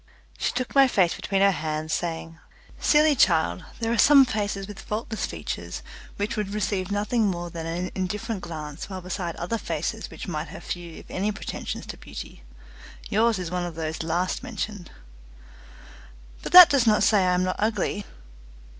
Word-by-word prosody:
She -, -, 0 dB
took 255 Hz, +1 st, -3 dB
my 275 Hz, -1 st, +7 dB
face 190 Hz, -8 st, +3 dB
between 195 Hz, -1 st, -1 dB
her 200 Hz, 0 st, +6 dB
hands, 155 Hz, -2 st, -3 dB
saying: 165 Hz, -1 st, -3 dB, 0.4 s
"Silly 300 Hz, 0 st, +5 dB
child, 160 Hz, -, +3 dB, 0.2 s
there 225 Hz, -1 st, -1 dB
are 235 Hz, -, 0 dB
some 280 Hz, -2 st, +8 dB
faces 205 Hz, -4 st, -2 dB
with 205 Hz, -1 st, -9 dB
faultless 220 Hz, +1 st, -3 dB
features, -, -, -6 dB, 0.3 s
which 205 Hz, +3 st, -2 dB
would 210 Hz, -1 st, -3 dB
receive 190 Hz, -2 st, -1 dB
nothing 210 Hz, +2 st, +1 dB
more 175 Hz, -2 st, -3 dB
than 165 Hz, -1 st, -5 dB
an 175 Hz, +2 st, -3 dB
indifferent 205 Hz, +3 st, -3 dB
glance 155 Hz, -1 st, -7 dB
while 190 Hz, -1 st, -6 dB
beside 180 Hz, -1 st, -4 dB
other 220 Hz, +7 st, -3 dB
faces -, -, -3 dB
which -, -, -8 dB
might 155 Hz, -2 st, -3 dB
have 185 Hz, +6 st, -10 dB
few 175 Hz, -2 st, -6 dB
if -, -, -11 dB
any 200 Hz, +3 st, 0 dB
pretensions 200 Hz, -, -5 dB
to -, -, -8 dB
beauty. -, -, -9 dB, 0.7 s
Yours 225 Hz, +1 st, +3 dB
is 180 Hz, -2 st, -5 dB
one 180 Hz, 0 st, -1 dB
of 175 Hz, -2 st, -5 dB
those 160 Hz, -1 st, -3 dB
last 170 Hz, +3 st, -1 dB
mentioned." 205 Hz, -5 st, -5 dB, 1.5 s
"But -, -, -6 dB
that 360 Hz, -1 st, +12 dB
does 265 Hz, -5 st, +3 dB
not 210 Hz, -1 st, +4 dB
say 210 Hz, 0 st, +5 dB
I 180 Hz, -1 st, +3 dB
am 180 Hz, -, +1 dB
not 185 Hz, 0 st, -1 dB
ugly." 210 Hz, -1 st, 0 dB
195 Hz, 175 wpm, -25 LUFS, 170-215 Hz, 1.5 s, that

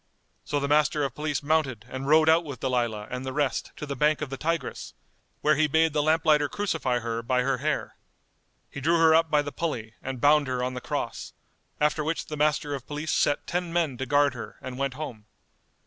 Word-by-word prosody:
So 145 Hz, -, -1 dB
the 140 Hz, -, -1 dB
Master 150 Hz, +1 st, +3 dB
of 135 Hz, -3 st, -2 dB
Police 150 Hz, 0 st, -2 dB
mounted 140 Hz, -7 st, 0 dB
and 130 Hz, +1 st, -6 dB
rode 155 Hz, +1 st, +5 dB
out 165 Hz, +2 st, +5 dB
with 140 Hz, -6 st, -7 dB
Dalilah 120 Hz, -5 st, -1 dB
and 125 Hz, +1 st, -4 dB
the 130 Hz, -, -4 dB
rest 145 Hz, -1 st, -1 dB
to -, -, -6 dB
the 140 Hz, -1 st, -4 dB
bank 150 Hz, +3 st, +2 dB
of 145 Hz, -3 st, -4 dB
the -, -, -2 dB
Tigris, 165 Hz, +4 st, -3 dB, 0.5 s
where 150 Hz, -, +4 dB
he 155 Hz, +2 st, +3 dB
bade 160 Hz, +1 st, +2 dB
the 150 Hz, -, +2 dB
lamp 160 Hz, +2 st, +2 dB
lighter 150 Hz, -2 st, +4 dB
crucify 165 Hz, -11 st, -1 dB
her 115 Hz, -1 st, -3 dB
by 125 Hz, +1 st, +1 dB
her 135 Hz, -1 st, 0 dB
hair. 150 Hz, +2 st, -2 dB, 0.7 s
He 140 Hz, -, -7 dB
drew 165 Hz, +4 st, +3 dB
her 165 Hz, -1 st, +6 dB
up 165 Hz, 0 st, +4 dB
by 150 Hz, -1 st, +3 dB
the 145 Hz, -, -5 dB
pulley 120 Hz, -11 st, -4 dB
and 130 Hz, -1 st, -5 dB
bound 145 Hz, +2 st, +4 dB
her 125 Hz, -1 st, -1 dB
on 130 Hz, 0 st, -2 dB
the 125 Hz, -, -5 dB
cross; -, -, -4 dB, 0.5 s
after 150 Hz, +1 st, +1 dB
which 160 Hz, +2 st, -2 dB
the 155 Hz, -, -6 dB
Master 150 Hz, -1 st, +1 dB
of 135 Hz, -3 st, -6 dB
Police 150 Hz, +1 st, -3 dB
set 145 Hz, -, +1 dB
ten 175 Hz, -1 st, -2 dB
men 165 Hz, -6 st, 0 dB
to 130 Hz, -, -3 dB
guard 145 Hz, 0 st, +3 dB
her 120 Hz, -, -8 dB
and 130 Hz, 0 st, -7 dB
went 135 Hz, -1 st, -1 dB
home. 120 Hz, -8 st, -7 dB
145 Hz, 225 wpm, -26 LUFS, 130-155 Hz, 0.7 s, her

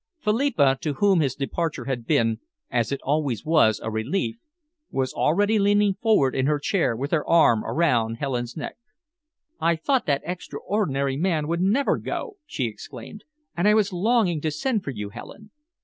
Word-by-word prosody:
Philippa, 210 Hz, -, +2 dB
to 150 Hz, -, -1 dB
whom 195 Hz, +4 st, +3 dB
his 140 Hz, -5 st, 0 dB
departure 145 Hz, -1 st, -3 dB
had 125 Hz, -3 st, -4 dB
been, 115 Hz, -1 st, +2 dB, 0.3 s
as 120 Hz, -3 st, 0 dB
it 140 Hz, -, -2 dB
always 140 Hz, -4 st, -1 dB
was, 155 Hz, -10 st, +4 dB
a 110 Hz, -, -3 dB
relief, 115 Hz, -, -2 dB, 0.5 s
was 130 Hz, -1 st, -2 dB
already 205 Hz, +7 st, +2 dB
leaning 205 Hz, 0 st, +3 dB
forward 190 Hz, -, +2 dB
in 130 Hz, 0 st, 0 dB
her 150 Hz, 0 st, +2 dB
chair 150 Hz, -, 0 dB
with 140 Hz, +5 st, -4 dB
her 160 Hz, -3 st, +1 dB
arm 155 Hz, -10 st, +5 dB
around 120 Hz, -9 st, +1 dB
Helen's 125 Hz, -1 st, -3 dB
neck. 150 Hz, -, -6 dB, 0.8 s
"I 170 Hz, 0 st, +2 dB
thought 255 Hz, -, 0 dB
that 140 Hz, -2 st, +1 dB
extraordinary 160 Hz, -6 st, -2 dB
man 160 Hz, -3 st, 0 dB
would 170 Hz, +2 st, -1 dB
never 220 Hz, +9 st, +2 dB
go," 425 Hz, -5 st, -5 dB
she 130 Hz, -, -2 dB
exclaimed, 120 Hz, -, -9 dB, 0.3 s
"and 175 Hz, +4 st, +1 dB
I 210 Hz, -, +5 dB
was 205 Hz, -2 st, +2 dB
longing 185 Hz, -4 st, +1 dB
to 155 Hz, -, 0 dB
send 210 Hz, -, -1 dB
for -, -, -5 dB
you, 105 Hz, -6 st, -5 dB
Helen. 210 Hz, -, -11 dB
155 Hz, 170 wpm, -24 LUFS, 130-200 Hz, 0.8 s, arm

